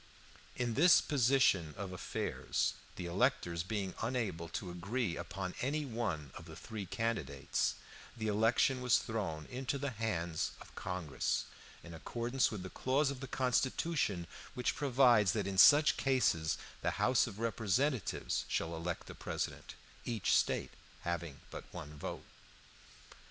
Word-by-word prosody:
In 120 -2 -1
this 165 +8 +7
position 120 - +3
of 100 -1 -5
affairs, 90 - -1 0.2
the 90 - -5
electors 85 -3 +1
being 95 +1 -3
unable 110 -9 -2
to 90 +2 -4
agree 95 +2 -2
upon 95 +1 -4
any 145 +3 0
one 105 - -3
of - - -10
the - - -10
three 105 -4 -6
candidates, 85 -12 -1 0.4
the 110 - -3
election 115 +5 +3
was 125 -1 +5
thrown 95 -9 -3
into 130 +2 -3
the 140 0 -2
hands 85 -8 -2
of - - -13
Congress, 90 -5 -2 0.4
in 85 - -10
accordance 120 +10 0
with 105 -4 -5
the 95 - -7
clause 140 +2 +1
of 135 - -6
the 135 - -6
Constitution 130 - 0 0.3
which 125 - 0
provides 125 -8 +4
that 105 -3 -1
in 95 -1 -1
such 150 +7 +8
cases 125 - +2 0.2
the - - -1
House 125 0 +3
of 100 -4 -8
Representatives 115 +3 0
shall 85 0 -1
elect 85 +1 -4
a - - -7
president, - - -4 0.3
each 110 -5 +1
State - - +1 0.3
having 85 -4 -4
but - - -7
one 75 +1 -8
vote. 75 - -6
110 Hz, 140 wpm, -34 LUFS, 85-125 Hz, 0.4 s, such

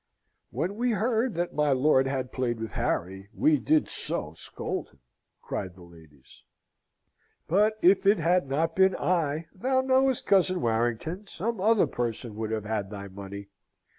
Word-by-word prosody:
"When 195 +4 -3
we 245 0 +1
heard 225 +1 0
that 175 +1 -2
my 150 -2 +2
lord 135 0 +3
had 130 -2 -3
played 120 -3 -2
with 115 -1 -5
Harry, 95 +3 -3
we 150 -2 +3
did 155 +4 +2
so 75 0 -2
scold - - -5
him," 70 - -27 0.4
cried 90 -2 -5
the 90 - -14
ladies. 80 -5 -18 1.0
"But 210 +5 +3
if 190 +2 +5
it 205 +1 +6
had 170 -2 +1
not 165 +4 0
been 190 0 +4
I, 165 -3 0
thou 260 +7 +1
knowest, 260 -1 +2
cousin 185 -2 +3
Warrington, 120 - -1
some 215 +3 -3
other 220 +1 +4
person 120 -1 -3
would 110 -1 -3
have 110 -2 -3
had 105 -2 -2
thy 100 -1 -8
money. 100 +1 -9
150 Hz, 160 wpm, -27 LUFS, -, 1.0 s, it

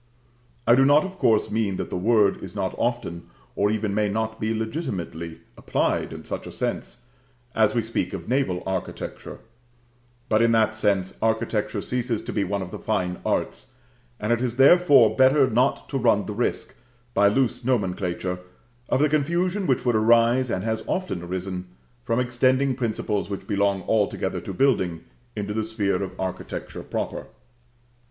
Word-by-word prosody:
I 120 - +6
do 130 +2 +6
not, 145 +3 +5
of 190 0 -8
course, 110 -9 +2
mean 105 -3 0
that - - -4
the - - -2
word 105 +1 +3
is 95 +1 -8
not 95 -2 -2
often, 85 -9 -2 0.3
or 100 - +2
even 105 -1 -1
may 105 0 +1
not 110 +2 -2
be 110 +1 -1
legitimately, 110 - -4
applied - - -1
in - - -9
such - - -5
a - - -7
sense - - -4 0.5
(as 110 0 +2
we 115 - +1
speak 115 +1 -2
of 90 -3 -6
naval 125 -9 0
architecture); 95 -1 -5 0.9
but 110 -2 +3
in 115 0 +4
that 110 -1 +3
sense 100 -4 0
architecture 110 -2 0
ceases 125 -2 -2
to - - -5
be - - +1
one 100 -1 -2
of 90 - -9
the - - -6
fine 90 -5 -1
arts, - - -2 0.4
and 110 +3 +1
it 120 - -1
is 120 -2 -1
therefore 140 -4 +6
better 135 +1 +5
not 125 +3 +1
to 135 - -1
run 110 -4 +3
the 105 - -4
risk, 120 +4 -2 0.4
by 100 - +4
loose 125 +3 +1
nomenclature, 90 -6 -1 0.5
of 130 - +2
the 150 - +5
confusion 170 +6 0
which 130 -1 +1
would 120 -2 +2
arise, 120 +3 +4
and 95 - -2
has 110 0 -2
often 185 - -2
arisen, 90 +1 -4 0.4
from 115 - 0
extending 130 +2 +2
principles 110 -4 -2
which 100 - -5
belong 100 -2 0
altogether 105 0 0
to - - -6
building, 95 -12 +1 0.3
into 105 -1 -3
the 110 +1 -1
sphere 110 -3 -1
of 95 -1 -6
architecture 95 -1 -5
proper. - - -4
110 Hz, 170 wpm, -24 LUFS, 100-125 Hz, 0.9 s, I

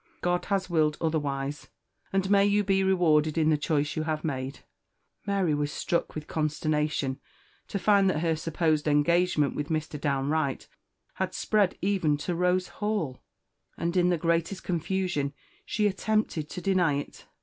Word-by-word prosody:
God 175 0 0
has 195 -2 0
willed 155 -3 +1
otherwise, 145 -3 -2 0.4
an 195 0 +1
may 200 0 +5
you 205 +1 +3
be 195 -1 +2
rewarded 160 -5 +3
in 160 -1 +3
the - - +4
choice 150 0 0
you 155 - -1
have 155 -1 -2
made!" 135 -3 -4 0.7
Mary 195 -5 +1
was 145 0 -1
struck 170 - -2
with 155 -1 -5
consternation 150 -3 -1 0.5
to - - -3
find 200 -1 +4
that 155 -4 0
her 165 -1 +1
supposed 155 -1 0
engagement 150 +1 +3
with 145 0 -3
Mr. 155 -2 -3
Downe 140 -1 0
Wright 155 -4 -1 0.5
had - - -3
spread 205 -4 +1
even 185 -7 +2
to 175 +4 -3
Rose 180 +1 +1
Hall; 205 -11 -2 0.6
and 170 +1 -2
in 180 -1 +4
the 175 - +2
greatest 170 +3 0
confusion 175 -4 -1 0.3
she 210 - 0
attempted 205 -6 0
to 180 - -6
deny 180 -6 +2
it. 145 - -6
160 Hz, 160 wpm, -28 LUFS, 150-185 Hz, 0.7 s, may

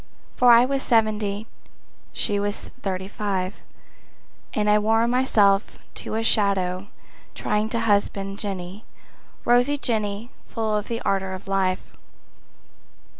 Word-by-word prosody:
For 245 -1 +6
I 235 +1 +7
was 275 +1 -1
seventy, 215 -3 +1 0.7
she 205 -2 0
was 205 0 -4
thirty—five, 190 -1 -3 0.9
And 210 -1 0
I 210 0 +5
wore 225 +2 +2
myself 215 -5 +3 0.2
to - - -5
a 225 - 0
shadow 195 -3 +1 0.5
trying 210 +1 -1
to 230 0 -1
husband 200 -2 0
Jenny, 195 0 -5 0.6
rosy 245 +4 +4
Jenny 220 -2 -2 0.2
full 220 -2 -1
of 210 -1 -2
the 230 0 -3
ardor 190 -1 0
of 185 - -11
life. 190 -1 -1
210 Hz, 120 wpm, -24 LUFS, 195-225 Hz, 0.9 s, I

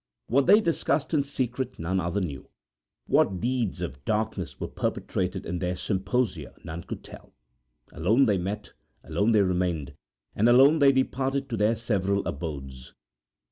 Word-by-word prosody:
What 135 +3 +2
they 210 +2 +7
discussed 165 -3 0
in 150 - +4
secret 130 -2 -3
none 90 +3 -1
other 90 +3 -1
knew. 70 -8 -5 0.6
What 95 -2 +2
deeds 120 -2 -1
of 65 +2 -5
darkness 110 -2 -2
were - - -3
perpetrated - - -2
in 90 +1 -3
their 90 0 -1
symposia 95 - -2
none 85 0 -7
could - - -7
tell. - - -13 0.6
Alone 110 +12 +3
they 100 -5 +2
met, 100 +3 -5 0.3
alone 100 +9 +1
they 105 -3 +5
remained, 90 -6 -1 0.4
and 110 +4 +3
alone 135 +6 +6
they 140 -1 +7
departed 135 +1 0
to 115 - -2
their 105 +3 +3
several 100 -3 0
abodes. 70 -4 -6
100 Hz, 150 wpm, -27 LUFS, 85-125 Hz, 0.6 s, they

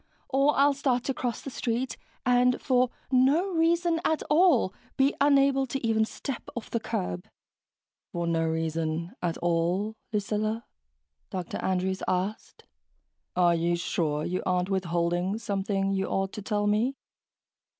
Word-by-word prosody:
Or 275 +2 +3
I'll 285 +1 +5
start 260 -3 0
to 270 - -1
cross 245 -2 -3
the 275 - -7
street 245 +1 -2 0.3
and, 250 0 +4
for 255 -2 +2 0.2
no 280 +9 +3
reason 335 0 +2
at 315 - +1
all, 300 - +4 0.2
be 275 +1 +4
unable 275 -1 +4
to 265 0 -3
even 220 -1 +3
step 260 +3 -5
off 235 - -6
the 230 - 0
curb...." 90 - -3 0.8
"For 170 0 -2
no 165 -1 +1
reason 160 +1 -2
at 175 -1 -1
all?" 175 +5 0 1.4
Dr. 180 -2 -4
Andrews 190 0 -1
asked. 190 +4 -2 0.7
"Are 175 -1 +4
you 170 +1 +1
sure 155 -3 -1
you 185 +1 -1
aren't 180 +1 0
withholding 175 +1 0
something 195 -2 -1
you 195 -1 0
ought 195 0 -1
to 215 - -6
tell 205 0 -1
me?" 220 +6 +1
205 Hz, 140 wpm, -28 LUFS, 175-265 Hz, 1.4 s, I'll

